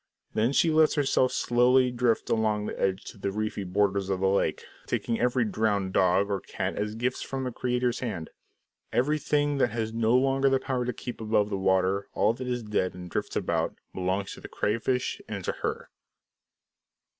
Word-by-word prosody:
Then 115 Hz, +4 st, +2 dB
she 160 Hz, +3 st, +3 dB
lets 155 Hz, 0 st, +4 dB
herself 135 Hz, -3 st, +2 dB
slowly 125 Hz, +1 st, +3 dB
drift 120 Hz, -2 st, 0 dB
along 110 Hz, -2 st, +1 dB
the -, -, -5 dB
edge 95 Hz, +1 st, 0 dB
to -, -, -10 dB
the 100 Hz, -, -2 dB
reedy 105 Hz, 0 st, -2 dB
borders 100 Hz, +1 st, 0 dB
of 95 Hz, -1 st, 0 dB
the 95 Hz, -, +2 dB
lake, 100 Hz, -, 0 dB, 0.2 s
taking 115 Hz, -, -1 dB
every 125 Hz, 0 st, +2 dB
drowned 105 Hz, -3 st, 0 dB
dog 95 Hz, +2 st, +3 dB
or 100 Hz, -, 0 dB
cat 95 Hz, -1 st, -3 dB
as 105 Hz, +1 st, -2 dB
gifts 125 Hz, +3 st, -1 dB
from 135 Hz, -1 st, -4 dB
the 125 Hz, -, -2 dB
Creator's 125 Hz, 0 st, -1 dB
hand. 100 Hz, -10 st, -4 dB, 0.6 s
Everything 145 Hz, +1 st, +1 dB
that 120 Hz, -, +3 dB
has 110 Hz, -1 st, -3 dB
no 115 Hz, +1 st, +2 dB
longer 135 Hz, +1 st, +3 dB
the 135 Hz, 0 st, +2 dB
power 130 Hz, -2 st, -2 dB
to 125 Hz, -, 0 dB
keep 125 Hz, 0 st, -7 dB
above 105 Hz, -1 st, +1 dB
the -, -, 0 dB
water, 95 Hz, +1 st, +2 dB
all -, -, +3 dB
that 125 Hz, +2 st, -6 dB
is 125 Hz, -1 st, -2 dB
dead 100 Hz, -4 st, -1 dB
and 90 Hz, -1 st, -9 dB
drifts -, -, -3 dB
about, -, -, 0 dB, 0.2 s
belongs 95 Hz, +1 st, -2 dB
to -, -, -11 dB
the -, -, -8 dB
crayfish 115 Hz, +4 st, -1 dB
and -, -, -4 dB
to -, -, +1 dB
her. -, -, -3 dB
110 Hz, 190 wpm, -27 LUFS, 100-125 Hz, 0.6 s, lets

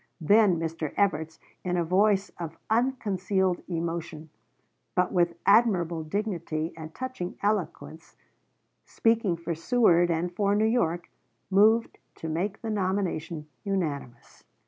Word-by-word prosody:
Then 200 Hz, +2 st, +4 dB
Mr. 160 Hz, -2 st, -4 dB
Evarts, 160 Hz, -5 st, 0 dB, 0.3 s
in 180 Hz, -1 st, -1 dB
a 175 Hz, -, +2 dB
voice 195 Hz, +3 st, +2 dB
of 165 Hz, -1 st, -6 dB
unconcealed 200 Hz, -6 st, +1 dB
emotion, 165 Hz, -2 st, -4 dB, 0.6 s
but 180 Hz, -, +2 dB
with 175 Hz, -2 st, +2 dB
admirable 180 Hz, -7 st, +3 dB
dignity 170 Hz, -3 st, -3 dB
and 160 Hz, 0 st, -9 dB
touching 255 Hz, -9 st, -5 dB
eloquence, 185 Hz, -5 st, -2 dB, 0.7 s
speaking 225 Hz, -6 st, +1 dB
for 170 Hz, 0 st, -3 dB
Seward 175 Hz, -1 st, +3 dB
and 175 Hz, +1 st, -1 dB
for 200 Hz, 0 st, +2 dB
New 215 Hz, +1 st, +3 dB
York, 175 Hz, -7 st, 0 dB, 0.4 s
moved 220 Hz, +4 st, +4 dB, 0.2 s
to 160 Hz, -, -7 dB
make 185 Hz, +6 st, -2 dB
the 225 Hz, -, -2 dB
nomination 185 Hz, -6 st, -2 dB, 0.2 s
unanimous. 145 Hz, -11 st, -4 dB
180 Hz, 120 wpm, -27 LUFS, 165-205 Hz, 0.7 s, Then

